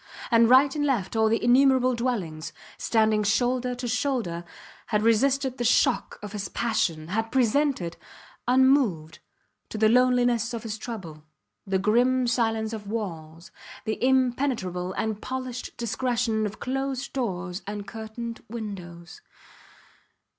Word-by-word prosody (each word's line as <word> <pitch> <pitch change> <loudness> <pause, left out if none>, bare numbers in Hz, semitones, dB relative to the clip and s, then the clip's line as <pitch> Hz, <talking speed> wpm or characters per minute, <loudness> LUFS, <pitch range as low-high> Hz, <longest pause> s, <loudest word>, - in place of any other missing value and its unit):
And 230 0 +5
right 270 +3 +6
and 295 - 0
left 240 -9 0
all 220 0 +3
the 225 - 0
innumerable 255 +1 +4
dwellings, 180 -11 -3 0.3
standing 220 -2 +2
shoulder 245 +4 +1
to 245 0 -5
shoulder, 230 -9 -1 0.4
had 210 -1 0
resisted 260 +3 +2
the - - 0
shock 245 +2 +2
of 210 - -6
his 200 -2 -4
passion, 170 -9 -1
had 225 +4 -2
presented, 255 - +1 0.5
unmoved, 250 - +3 0.5
to - - -6
the 215 0 +4
loneliness 245 -1 +3
of 230 - -6
his 220 -1 -5
trouble, 185 -11 -7 0.4
the 190 0 +1
grim 245 +6 +2
silence 225 -2 0
of 210 -2 -7
walls, 170 -6 -6 0.3
the 220 +2 -3
impenetrable 245 -8 +1
and 215 0 -2
polished 255 -1 -5
discretion 235 -2 0
of 205 - -9
closed 270 +1 -3
doors 190 -7 -3
and 205 0 -5
curtained 225 +1 -7
windows. 180 -6 -8
230 Hz, 130 wpm, -26 LUFS, 205-255 Hz, 0.5 s, right